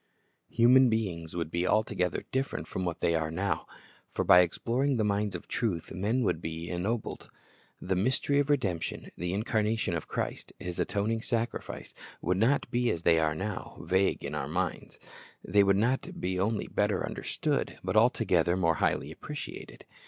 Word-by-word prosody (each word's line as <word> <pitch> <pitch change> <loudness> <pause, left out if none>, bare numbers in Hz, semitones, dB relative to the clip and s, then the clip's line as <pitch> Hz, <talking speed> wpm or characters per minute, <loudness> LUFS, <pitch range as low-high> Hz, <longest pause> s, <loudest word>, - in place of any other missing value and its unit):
Human 125 +2 +6
beings 90 -8 -2
would 85 -2 -3
be 85 +1 0
altogether 90 -5 +1
different 135 +1 -2
from 95 - -3
what 85 -2 -3
they - - +3 0.2
now 95 +5 -1
are; - - -2 0.5
for - - -1
by 90 - +8
exploring 120 +10 +1
the 110 - +2
mines 105 -1 0
of 85 - -7
truth 95 -9 -2
men 110 +7 0
would 85 -6 0
be 80 +1 -5
ennobled. 100 +6 -3 0.5
The 95 +1 -1
mystery 135 +8 +2
of 145 0 +1
redemption, 100 - -1
the 90 +1 -3
incarnation 110 -1 0
of 80 - -4
Christ, - - -4
His 90 -1 -6
atoning 110 +2 0
sacrifice, 115 0 -3 0.3
would 90 +2 0
not 120 +8 +2
be 120 -1 +2
as 85 - -2
they 85 -1 +5
are 80 -1 +1
now, 100 +3 -5
vague 95 +1 +1
in - - -4
our 70 - -2
minds. 90 +4 -3 0.5
They 100 -1 +5
would 100 0 +4 0.4
be 90 +1 -1
not - - +3
only 110 +1 0
better - - 0
understood, - - -2
but - - -2
altogether 85 +1 +3
more 85 -4 +2
highly - - +1
appreciated. - - -8
100 Hz, 165 wpm, -29 LUFS, 85-115 Hz, 0.5 s, by